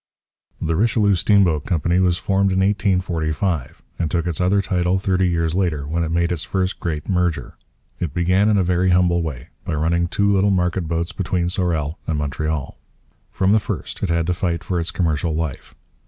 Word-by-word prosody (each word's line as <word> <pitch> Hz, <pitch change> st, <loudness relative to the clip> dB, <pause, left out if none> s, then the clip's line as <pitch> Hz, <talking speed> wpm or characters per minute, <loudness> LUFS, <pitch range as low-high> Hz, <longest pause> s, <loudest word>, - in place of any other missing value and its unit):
The 80 Hz, 0 st, -1 dB
Richelieu 105 Hz, +1 st, +3 dB
Steamboat 90 Hz, -5 st, +3 dB
Company 85 Hz, +1 st, +1 dB
was 90 Hz, -2 st, +2 dB
formed 95 Hz, +1 st, +1 dB
in 95 Hz, 0 st, +1 dB
1845, 90 Hz, -, -1 dB, 0.2 s
and 85 Hz, -3 st, 0 dB
took 85 Hz, 0 st, -1 dB
its 85 Hz, -1 st, -2 dB
other 95 Hz, +3 st, +3 dB
title 90 Hz, -1 st, +1 dB
thirty 95 Hz, -1 st, +1 dB
years 85 Hz, -2 st, 0 dB
later, 85 Hz, -7 st, 0 dB
when 85 Hz, +3 st, -1 dB
it 80 Hz, -, -2 dB
made 85 Hz, +1 st, +1 dB
its 80 Hz, -4 st, -1 dB
first 95 Hz, +4 st, -2 dB
great 80 Hz, -4 st, -3 dB
'merger.' 90 Hz, -4 st, -1 dB, 0.5 s
It 85 Hz, -5 st, -2 dB
began 90 Hz, +6 st, +2 dB
in 105 Hz, -, +3 dB
a 95 Hz, -, +3 dB
very 90 Hz, +1 st, +1 dB
humble 90 Hz, -1 st, +3 dB
way, 75 Hz, -7 st, -5 dB
by -, -, -3 dB
running 85 Hz, +3 st, +1 dB
two 100 Hz, +3 st, +1 dB
little 100 Hz, 0 st, +3 dB
market 90 Hz, -2 st, 0 dB
boats 85 Hz, +1 st, -2 dB
between 90 Hz, -2 st, -1 dB
Sorel 85 Hz, -4 st, -1 dB
and 80 Hz, -, -1 dB
Montreal. 75 Hz, 0 st, -3 dB, 0.5 s
From 95 Hz, 0 st, +1 dB
the 110 Hz, -, +5 dB
first -, -, -5 dB
it 100 Hz, -, -1 dB
had 85 Hz, -1 st, +1 dB
to 90 Hz, -, +1 dB
fight 85 Hz, -1 st, -2 dB
for 90 Hz, -1 st, -1 dB
its 85 Hz, -, -2 dB
commercial 80 Hz, -2 st, -1 dB
life. 80 Hz, -4 st, -4 dB
85 Hz, 190 wpm, -21 LUFS, 80-95 Hz, 0.5 s, the